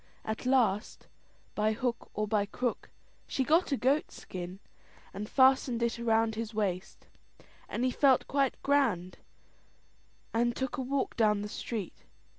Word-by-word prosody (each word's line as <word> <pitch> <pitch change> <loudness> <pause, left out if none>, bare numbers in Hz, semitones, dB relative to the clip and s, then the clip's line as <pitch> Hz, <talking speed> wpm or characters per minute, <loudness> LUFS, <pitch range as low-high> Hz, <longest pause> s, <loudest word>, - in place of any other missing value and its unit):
At 220 +3 -3
last, 235 -6 +1 0.5
by 215 +1 +1
hook 240 +1 -3
or 215 +1 -1
by 205 -1 +1
crook, 245 +3 -3 0.4
she 265 - 0
got 320 +5 +3
a 275 - +2
goat 275 +5 +2
skin, 180 0 -7 0.6
and 210 +2 -5
fastened 260 -3 +4
it 235 0 -1
round 225 -1 +2
his 225 0 -5
waist, 195 -3 -2 0.6
and 245 - -1
he 255 - +2
felt 265 0 +3
quite 275 -2 +1
grand, 230 -11 +1 1.1
and 240 +1 +1
took 265 +1 -3
a - - -1
walk 270 +2 -1
down 210 -3 +2
the - - -4
street. 210 -3 -5
235 Hz, 145 wpm, -30 LUFS, 210-260 Hz, 1.1 s, fastened